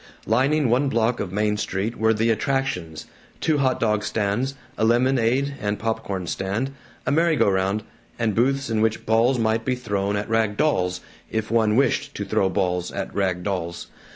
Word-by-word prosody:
Lining 135 +6 +2
one 130 +4 +2
block 115 0 +1
of 90 - -3
Main 105 +1 0
Street 105 +3 -2
were 110 0 +2
the 115 +1 +2
"attractions" 90 - -2 0.3
two 155 -2 +1
hot 130 -2 +1
dog 105 -2 +1
stands, 115 +6 -1 0.2
a - - -1
lemonade 125 +3 +2
and 105 0 -1
pop 115 0 -2
corn 95 -2 -4
stand, 100 +10 -2 0.3
a 125 - +1
merry 165 +2 +3
go - - +3
round, 95 +2 +1 0.3
and 115 -2 0
booths 135 +5 +1
in 110 -1 0
which 110 0 0
balls 115 +4 +3
might 110 0 +1
be 130 +1 0
thrown 100 -4 -1
at 105 0 -2
rag 110 -2 +1
dolls, 90 -12 +1 0.3
if 110 0 -2
one 110 -2 +3
wished 135 0 +1
to - - -3
throw 95 - +1
balls 90 -2 -1
at - - -5
rag 95 -3 0
dolls. 90 -3 -3
110 Hz, 180 wpm, -23 LUFS, 100-125 Hz, 0.3 s, merry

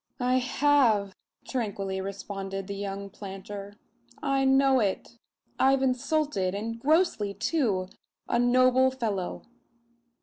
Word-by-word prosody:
"I 255 +1 +3
have," 245 -7 +2 0.3
tranquilly 200 -6 -3
responded 195 0 -5
the 200 - -5
young 200 0 -5
planter. 200 0 -8 0.4
"I 275 -2 +1
know 270 0 +4
it. 215 +2 -2 0.4
I've 270 0 +4
insulted 255 - 0
and 230 +3 -4
grossly 275 - +2
too 225 - 0 0.4
a 235 - +1
noble 255 +1 +4
fellow." 215 -8 -3
230 Hz, 105 wpm, -27 LUFS, 195-265 Hz, 0.4 s, know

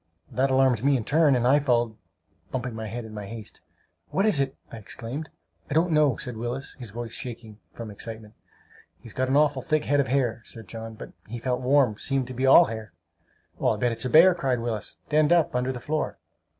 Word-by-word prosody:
That 130 +3 +1
alarmed 130 -3 +3
me 140 0 +4
in 120 - -3
turn, 150 -2 +4
and 120 -1 +1
I 140 +4 +5
followed 120 -4 +2
them, 110 - -20 0.5
bumping 125 -2 -3
my 110 0 -5
head 115 +2 -5
in 110 - -10
my 105 -2 -6
haste. 110 -1 -9 0.5
"What 195 - +1
is 205 -10 +4
it?" 135 -1 0 0.2
I - - -7
exclaimed. 120 +7 -6 0.4
"I 140 - -2
don't 170 +2 +3
know," 150 -5 +3
said 125 -3 -5
Willis, 120 +4 -4
his 120 -3 -7
voice 115 +2 -6
shaking 115 -3 -8 0.2
from 115 -2 -7
excitement. 110 +1 -7 0.7
"He's - - -12
got 130 0 -1
an 135 - +3
awful 145 -3 +3
thick 155 +3 0
head 145 0 +2
of 140 - +2
hair," 125 -4 0
said 115 -2 -7
John; 115 +1 -7
"but - - -10
he 120 +3 -6
felt 125 +1 -2
warm! 130 -4 +3
Seemed 135 -2 -1
to - - -5
be 130 +2 0
all 170 +6 +8
hair!" 110 - -7 0.7
"I'll - - +2
bet 120 -1 +1
it's 115 -1 -3
a - - 0
bear!" 170 +6 +7
cried 135 -8 -1
Willis. 115 -2 -4
"Denned 155 0 +3
up, 170 -6 +3
under 125 +1 0
the 125 - -6
floor!" 155 +5 -2
125 Hz, 220 wpm, -26 LUFS, 115-140 Hz, 0.7 s, all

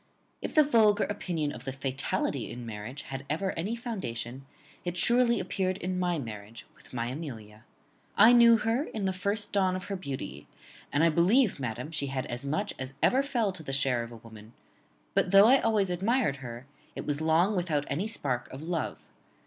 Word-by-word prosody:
"If - - -5
the 305 - +8
vulgar 215 -7 +4
opinion 170 -7 -2
of 125 -4 -9
the 135 - -4
fatality 135 0 -2
in 120 0 -7
marriage 115 +5 -7
had 135 0 -6
ever 185 +6 0
any 195 +8 -3
foundation, 135 - -5 0.4
it 175 0 -4
surely 235 +4 +3
appeared 185 0 -1
in 185 0 -3
my 175 -2 +1
marriage 110 -3 -8
with - - -19
my 115 -2 -2
Amelia. 115 -7 -8 0.5
I 225 +4 +8
knew 235 -1 +7
her 225 +6 0
in 215 -9 -4
the 190 - +1
first 200 +3 -2
dawn 190 -2 +2
of 185 - -4
her 200 - -4
beauty; 130 - -6 0.4
and, 145 +3 +2
I 165 - +6
believe, 185 - +3
madam, 125 +3 -4
she 155 -3 -1
had 135 -1 -3
as 120 +2 -5
much 175 +9 -2
as 130 +1 -6
ever 265 - +5
fell 240 -7 0
to 185 - -6
the 150 - -6
share 135 -3 +1
of 115 0 -7
a 115 - -9
woman; 110 0 -14 0.6
but, - - +2
though 200 +3 +8
I 265 +2 +6
always 210 -4 +2
admired 195 - +1
her, 120 -1 -8 0.3
it - - -5
was 145 0 -1
long 165 +6 +3
without 160 -5 0
any 165 +10 -1
spark 130 - -3
of 135 +3 -8
love. 165 -1 -3
165 Hz, 195 wpm, -29 LUFS, 130-205 Hz, 0.6 s, the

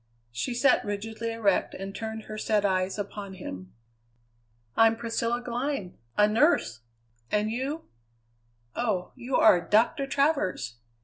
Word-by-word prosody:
She 240 - -3
sat 255 +2 +4
rigidly 220 +3 -4
erect 220 -4 +1
and 195 +1 -6
turned 220 +1 -5
her 215 - -8
sad 215 -1 +1
eyes 185 0 +1
upon 200 -1 -6
him. 95 - -8 1.0
"I'm 225 0 +5
Priscilla 230 +1 -1
Glynn 245 -5 -3 0.2
a 210 - +6
nurse! 215 - +2 0.5
And 210 +1 +1
you? 275 +7 -3 0.9
Oh! 210 -7 -1
you 250 +2 -3
are 180 -5 +6
Doctor 230 +8 +2
Travers! 270 - 0
220 Hz, 125 wpm, -27 LUFS, 195-240 Hz, 1.0 s, a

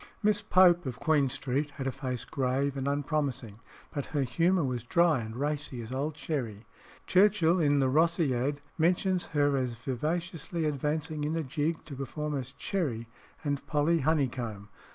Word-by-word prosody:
Miss 210 0 +3
Pope, 180 -5 +5
of 125 -1 -5
Queen 150 -4 +3
Street, 135 +3 -1
had 135 - -4
a 135 - 0
face 130 -2 -4
grave 135 0 0
and 135 0 -2
unpromising, 140 -6 -1 0.3
but 145 -2 -3
her 145 -3 0
humour 165 +8 +2
was 125 -3 -1
dry 170 +2 +3
and 110 -1 -6
racy 145 -1 -2
as 115 - -9
old 145 +4 -2
sherry. 115 -10 -3 0.4
Churchill, 185 -3 +4
in 145 -3 +3
the 135 - +3
"Rosciad," 145 -2 +2 0.2
mentions 180 +2 +2
her 145 -2 +2
as 125 -3 -1
vivaciously 160 +7 -3
advancing 150 +1 -1
in 155 +2 -1
a 165 - -1
jig 155 +4 -2
to 145 - -8
perform 150 +3 -3
as 130 -2 -4
Cherry 140 -10 -2 0.4
and 145 -2 -1
Polly 160 +3 +2
Honeycomb. 125 -9 -1
145 Hz, 160 wpm, -29 LUFS, 130-160 Hz, 0.4 s, Pope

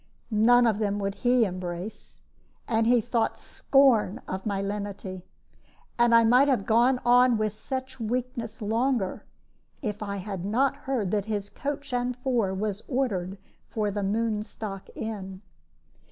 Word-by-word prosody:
None 240 +3 +5
of 220 -3 +2
them 205 -2 0
would 200 -1 -2
he 245 +1 +3
embrace, 185 +2 -6 0.5
and 225 -1 +2
he 240 -1 +5
thought 230 0 0
scorn 260 -8 +2
of 190 +2 -4
my 200 -2 -1
lenity. 200 -2 -4 0.8
And 235 -1 +5
I 230 - +7
might 250 +5 +5
have 250 -8 +1
gone 240 +3 +3
on 245 0 +5
with 215 -1 -1
such 260 +3 -6
weakness 235 -1 -3
longer, 225 -1 0 0.6
if 210 -3 -3
I 200 -1 -3
had 195 -2 -5
not 245 +7 +1
heard 235 -9 -2
that 205 -2 0
his 205 -2 -3
coach 280 -1 -5
and 245 0 0
four 245 -6 0
was 205 +1 -3
ordered 200 -9 -1 0.3
for 210 -2 -1
the 205 +1 -2
Moonstock 210 -1 -3
Inn. 195 -3 -6
220 Hz, 145 wpm, -27 LUFS, 200-245 Hz, 0.8 s, I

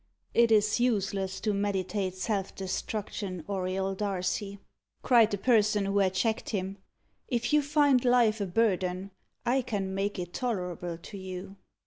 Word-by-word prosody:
"It 235 -1 +4
is 215 +1 +4
useless 195 -5 0
to 215 - 0
meditate 195 -1 -1
self 195 0 -2
destruction, 195 -1 -4
Auriol 190 0 -1
Darcy," 195 0 -2 0.5
cried 235 -4 +5
the 205 - -1
person 210 -2 +3
who 200 +1 +1
had 190 -1 +2
checked 220 +3 0
him. 195 -1 -3 0.5
"If 240 +3 -1
you 300 - +6
find 285 -3 +3
life 240 -4 +4
a 200 - -1
burden, 190 -2 0 0.3
I 260 +2 +3
can 200 -6 -3
make 200 +2 -1
it 175 -1 -5
tolerable 180 -8 -3
to 185 +4 -10
you." 185 +1 -7
200 Hz, 145 wpm, -29 LUFS, 190-225 Hz, 0.5 s, you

